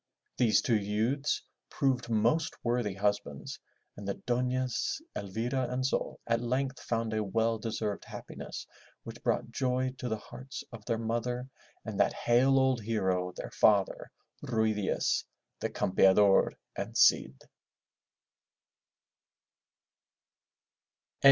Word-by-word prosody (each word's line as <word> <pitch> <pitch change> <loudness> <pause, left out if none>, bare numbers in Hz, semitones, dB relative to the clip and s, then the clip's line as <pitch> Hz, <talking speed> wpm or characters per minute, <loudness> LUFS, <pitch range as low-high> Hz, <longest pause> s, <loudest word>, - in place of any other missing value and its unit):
These 115 -3 +3
two 115 -3 +3
youths 110 +8 0 0.3
proved 130 -5 0
most 120 +9 +2
worthy 120 -5 0
husbands 100 +1 -2 0.4
and 100 - -8
the 100 - -1
Dofias 125 - -1 0.2
Elvira 120 +6 -2
and 130 +1 -1
Sol 135 - -1
at 115 0 +1
length 130 +2 -1
found 115 -1 -2
a 110 0 0
well 115 +3 +1
deserved 110 -2 -3
happiness - - -8 0.4
which - - -9
brought - - 0
joy 130 0 0
to 125 - -3
the 110 - -1
hearts 130 +5 -9
of 115 -3 -9
their 115 -2 0
mother 120 +2 -2 0.4
and - - -5
that - - +4
hale 130 +3 +3
old 130 -3 +3
hero, 95 -5 0
their - - -6
father, 100 -3 +3 0.3
Ruy 110 -2 +1
Diaz, 105 -2 0 0.4
the - - -1
Campeador 95 +1 +4 0.2
and - - -4
Cid. 65 0 +4
115 Hz, 120 wpm, -31 LUFS, 105-125 Hz, 0.4 s, that